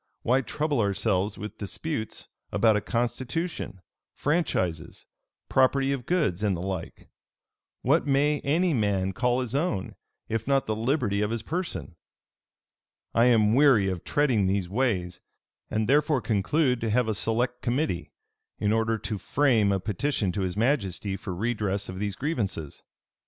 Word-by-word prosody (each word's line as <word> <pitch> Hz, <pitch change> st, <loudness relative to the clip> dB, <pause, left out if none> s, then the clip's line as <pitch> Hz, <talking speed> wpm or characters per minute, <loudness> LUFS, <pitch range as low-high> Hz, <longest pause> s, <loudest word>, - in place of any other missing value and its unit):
why 130 Hz, +3 st, +3 dB
trouble 150 Hz, +1 st, -1 dB
ourselves 100 Hz, 0 st, 0 dB
with 105 Hz, -, -7 dB
disputes 110 Hz, +2 st, -4 dB, 0.2 s
about 110 Hz, +1 st, +4 dB
a 105 Hz, -, +1 dB
constitution, 120 Hz, -, -3 dB, 0.3 s
franchises, 95 Hz, -, -1 dB, 0.4 s
property 135 Hz, +1 st, +3 dB
of 135 Hz, -4 st, -3 dB
goods, 150 Hz, -, +1 dB
and 100 Hz, -4 st, +1 dB
the -, -, -5 dB
like? 95 Hz, -2 st, -5 dB, 0.8 s
What 145 Hz, +4 st, +3 dB
may 145 Hz, +2 st, +2 dB
any 165 Hz, +6 st, +1 dB
man 100 Hz, -5 st, +1 dB
call 125 Hz, +3 st, +1 dB
his 125 Hz, -2 st, -4 dB
own, 140 Hz, -, -1 dB, 0.3 s
if 115 Hz, +1 st, -2 dB
not 135 Hz, -1 st, +2 dB
the 110 Hz, -, -1 dB
liberty 110 Hz, -3 st, 0 dB
of 105 Hz, -, +1 dB
his 115 Hz, 0 st, -3 dB
person? 165 Hz, -, -4 dB, 1.2 s
"I 115 Hz, -, +4 dB
am 110 Hz, -3 st, +4 dB
weary 130 Hz, -8 st, +5 dB
of 90 Hz, -2 st, -4 dB
treading 125 Hz, -10 st, +2 dB
these 95 Hz, -1 st, 0 dB
ways; 95 Hz, -5 st, -1 dB, 0.5 s
and 110 Hz, 0 st, 0 dB
therefore 145 Hz, +1 st, +3 dB
conclude 125 Hz, +4 st, +1 dB
to 115 Hz, -, -1 dB
have 120 Hz, +2 st, +2 dB
a 110 Hz, -, +1 dB
select 120 Hz, +4 st, -1 dB
committee, 120 Hz, -, -1 dB, 0.5 s
in 105 Hz, +1 st, +1 dB
order 115 Hz, 0 st, +1 dB
to 105 Hz, -1 st, -4 dB
frame 120 Hz, -8 st, +2 dB
a 95 Hz, -, +1 dB
petition 105 Hz, +1 st, -1 dB
to 100 Hz, -, -3 dB
his 90 Hz, 0 st, -2 dB
majesty 100 Hz, -, 0 dB
for 95 Hz, -, -6 dB
redress 105 Hz, -1 st, -1 dB
of 95 Hz, 0 st, -6 dB
these 100 Hz, -1 st, -2 dB
grievances. 100 Hz, -, -3 dB
115 Hz, 150 wpm, -27 LUFS, 100-135 Hz, 1.2 s, weary